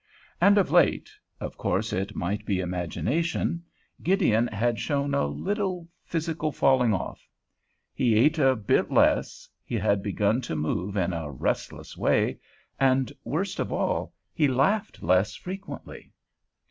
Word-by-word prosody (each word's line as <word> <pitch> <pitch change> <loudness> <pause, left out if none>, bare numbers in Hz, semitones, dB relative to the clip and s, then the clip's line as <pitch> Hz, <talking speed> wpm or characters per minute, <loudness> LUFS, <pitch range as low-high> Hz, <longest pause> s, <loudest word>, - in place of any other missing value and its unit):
And 200 +1 +6
of 200 - +2
late—of - - 0
course - - -1
it 95 +2 -2
might 100 +4 -2
be 95 -3 -1
imagination 120 - -1 0.4
—Gideon 155 - +3
had 115 +2 -1
shown 140 -1 -1
a 140 - +2
little 190 -4 -2 0.2
physical 160 -2 -2
falling 130 -5 +3
off. 95 - -4 0.7
He 120 -4 +2
ate 150 +9 +4
a 135 -2 +4
bit 105 -4 +1
less, - - +2 0.2
he - - -4
had 100 -1 +1
begun 105 +4 +1
to 115 - -4
move 90 +6 -2
in 90 -1 0
a 80 -3 -4
restless 70 - -3
way, - - +1 0.4
and, 130 -2 +2
worst - - -2
of - - -2
all, - - -1 0.2
he 150 - +3
laughed 140 +12 0
less 90 +4 +2
frequently. 195 +2 -8
130 Hz, 135 wpm, -26 LUFS, 100-165 Hz, 0.7 s, And